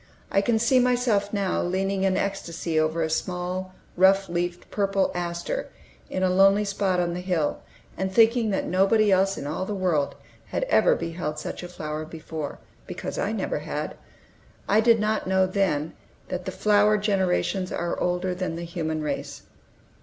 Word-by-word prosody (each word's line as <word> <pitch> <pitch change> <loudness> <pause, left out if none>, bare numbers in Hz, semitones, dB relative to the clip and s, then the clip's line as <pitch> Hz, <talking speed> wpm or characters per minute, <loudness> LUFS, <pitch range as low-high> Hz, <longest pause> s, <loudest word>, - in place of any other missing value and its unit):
I 195 - +3
can 225 +2 +2
see 235 +3 +4
myself 245 -5 +2
now 200 -3 0
leaning 190 +2 -1
in 190 -1 +2
ecstasy 170 -4 -2
over 160 +1 +1
a - - +1
small, 180 +2 -2 0.2
rough 195 +2 +4
leaved 175 +1 -2
purple 195 -1 +1
aster 175 - -3 0.4
in 185 - -2
a 185 - +3
lonely 195 +2 +5
spot 195 -2 0
on 175 -1 0
the 175 - -4
hill, 180 -5 -1 0.4
and 190 0 -2
thinking 225 +2 +4
that 195 - -1
nobody 195 +3 +3
else 195 +1 +3
in - - -5
all 155 +5 -2
the 205 +2 -3
world 175 -7 0 0.3
had - - -2
ever - - +4
beheld 165 -2 -4
such - - -5
a 175 - -6
flower 155 -3 -5
before, 160 -1 -6 0.3
because - - -5
I - - 0
never - - -2
had. - - -4 0.7
I 210 - +4
did 230 0 +5
not 215 -1 0
know 190 0 +3
then, 185 -6 0 0.4
that 180 0 -4
the 190 - -3
flower 210 +1 +3
generations 190 -2 0
are 170 0 -2
older 180 +1 0
than 180 -2 -3
the 170 - -5
human 160 -2 -3
race. 145 -2 -4
185 Hz, 170 wpm, -25 LUFS, 170-200 Hz, 0.7 s, lonely